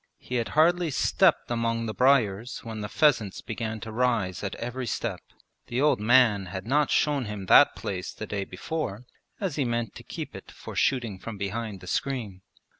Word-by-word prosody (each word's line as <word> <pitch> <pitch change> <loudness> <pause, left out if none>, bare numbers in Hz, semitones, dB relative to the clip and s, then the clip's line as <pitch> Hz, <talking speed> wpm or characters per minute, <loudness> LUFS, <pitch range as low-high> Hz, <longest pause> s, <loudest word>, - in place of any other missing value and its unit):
He 125 - -4
had 115 - -1
hardly 170 +2 +4
stepped 130 - +2
among 115 -1 0
the 110 - -3
briers 125 -4 +2
when 110 -2 -6
the 105 - -4
pheasants 140 -11 +2
began 110 0 -4
to 110 - -6
rise 115 -6 0
at 100 - -3
every 125 +1 -4
step - - -3 0.5
(the 120 - -2
old 150 -5 +3
man 110 -3 +4
had 95 +2 -6
not 145 +4 +2
shown 145 -4 +2
him 105 -2 -5
that - - +7
place 90 -2 -4
the 105 - -7
day 100 -1 -3
before 115 - -4 0.3
as 185 -8 -2
he 145 - +2
meant 120 -3 -2
to - - -11
keep - - -7
it - - -10
for - - -10
shooting 115 -7 0
from 115 0 -7
behind 100 0 -4
the 90 - -11
screen). 110 -7 -2
115 Hz, 190 wpm, -27 LUFS, 105-130 Hz, 0.5 s, that